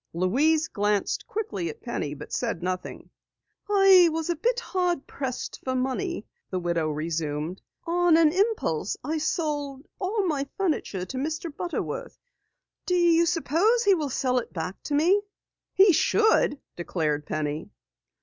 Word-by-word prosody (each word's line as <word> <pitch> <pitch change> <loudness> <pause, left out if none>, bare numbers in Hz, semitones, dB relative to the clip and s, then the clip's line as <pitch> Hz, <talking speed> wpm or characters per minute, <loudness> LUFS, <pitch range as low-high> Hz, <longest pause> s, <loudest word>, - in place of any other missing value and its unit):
Louise 285 - +2
glanced 205 -1 -1
quickly 205 - -3
at 150 - -8
Penny 150 - -3
but - - -10
said 170 - -2
nothing. 185 0 -4 0.6
"I 390 -4 +7
was 325 +1 -1
a - - -1
bit 485 +10 0
hard 360 - -1
pressed 260 -3 -5
for 260 0 -2
money," 265 - -2 0.2
the 185 - -2
widow 170 -3 0
resumed. 155 +2 -3 0.2
"On 345 -1 +3
an 320 -2 +5
impulse 380 - 0
I 310 +4 -1
sold 290 -3 -2
all 400 +1 0
my 285 -5 -1
furniture 305 - -1
to 260 - -6
Mr. 315 +2 -3
Butterworth. 485 +8 -4 0.7
Do 360 - +2
you 340 -1 +4
suppose 355 - +2
he 400 - +5
will 305 -6 -1
sell 255 -1 +1
it 235 - -8
back 180 +2 -5
to 290 - -1
me?" 355 +8 +4 0.5
"He 385 -1 +6
should," 435 -5 +3 0.2
declared 155 -4 -2
Penny. 150 0 -3
295 Hz, 145 wpm, -26 LUFS, -, 0.7 s, I